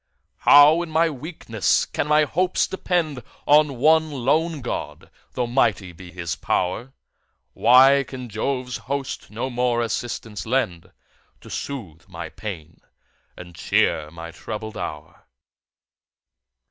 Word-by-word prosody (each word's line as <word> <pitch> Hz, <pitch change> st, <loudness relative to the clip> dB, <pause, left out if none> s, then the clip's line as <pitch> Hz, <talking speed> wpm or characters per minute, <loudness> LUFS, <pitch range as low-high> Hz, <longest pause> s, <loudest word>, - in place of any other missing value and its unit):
How 150 Hz, +3 st, +7 dB
in 170 Hz, -, -5 dB
my 160 Hz, +1 st, +2 dB
weakness 135 Hz, -, -1 dB
can -, -, -3 dB
my 150 Hz, 0 st, +4 dB
hopes 180 Hz, +5 st, +1 dB
depend 170 Hz, -8 st, -2 dB, 0.2 s
On 150 Hz, -2 st, +4 dB
one 160 Hz, +4 st, +4 dB
lone 150 Hz, +3 st, 0 dB
God, 125 Hz, -, -6 dB, 0.2 s
though 125 Hz, -, -1 dB
mighty 105 Hz, -7 st, +1 dB
be 90 Hz, +1 st, -12 dB
his 85 Hz, -2 st, -4 dB
pow'r? 110 Hz, +9 st, -2 dB, 0.6 s
Why 135 Hz, +3 st, +6 dB
can 130 Hz, -2 st, -8 dB
Jove's 125 Hz, +3 st, -3 dB
host 140 Hz, -1 st, -4 dB
no 120 Hz, +5 st, -4 dB
more 120 Hz, -1 st, +1 dB
assistance 110 Hz, -4 st, -4 dB
lend, 110 Hz, -9 st, -1 dB, 0.5 s
To -, -, -13 dB
soothe 95 Hz, -, -6 dB
my 85 Hz, -1 st, -7 dB
pains, 85 Hz, -6 st, -8 dB, 0.6 s
and 90 Hz, -1 st, -11 dB
cheer 75 Hz, -2 st, +1 dB
my 85 Hz, +1 st, -9 dB
troubled 110 Hz, +6 st, -7 dB
hour? -, -, -7 dB
125 Hz, 120 wpm, -23 LUFS, 100-145 Hz, 0.6 s, How